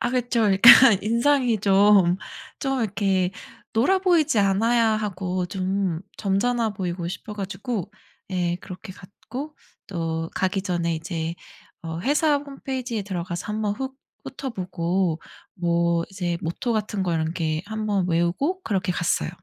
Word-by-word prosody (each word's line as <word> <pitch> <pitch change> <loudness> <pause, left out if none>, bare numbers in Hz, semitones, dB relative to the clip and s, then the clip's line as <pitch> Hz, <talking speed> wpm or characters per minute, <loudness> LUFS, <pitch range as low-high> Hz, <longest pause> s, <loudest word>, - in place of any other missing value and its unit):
아 240 - 0
그쵸. 245 -2 0
그러니까 205 +3 +8 0.3
인상이 235 +1 +2
좀, 195 -3 +5 0.4
좀 270 -2 -1
이렇게 195 -3 0 0.4
놀아 275 +13 +3
보이지 330 - +3
않아야 225 +4 +3
하고 185 -4 -2
좀 190 -2 -1 0.2
점잖아 225 +3 +1
보이고 175 -3 -4
싶어 210 +3 -7
가지고 210 +1 -4 0.4
예 175 -2 0
그렇게 185 +1 -9
갔고 255 +11 -9 0.3
또 165 -3 -3
가기 190 0 0
전에 170 -3 -1
이제 165 0 -4 0.5
어 165 0 -5
회사 295 - +2
홈페이지에 265 -5 -4
들어가서 180 -2 -4
한번 210 -1 -1
훅 265 +3 -5 0.3
훑어보고 185 - -2 0.4
뭐 170 -1 +1
이제 175 -3 -2
모토 170 +9 -2
같은 210 -2 -1
거 175 -2 -1
이런 160 0 -1
게 160 -1 -1
한번 210 -3 -1
외우고 175 - 0
그렇게 190 -3 -1
갔어요. 170 - 0
195 Hz, 280 characters per minute, -24 LUFS, 175-235 Hz, 0.5 s, 그러니까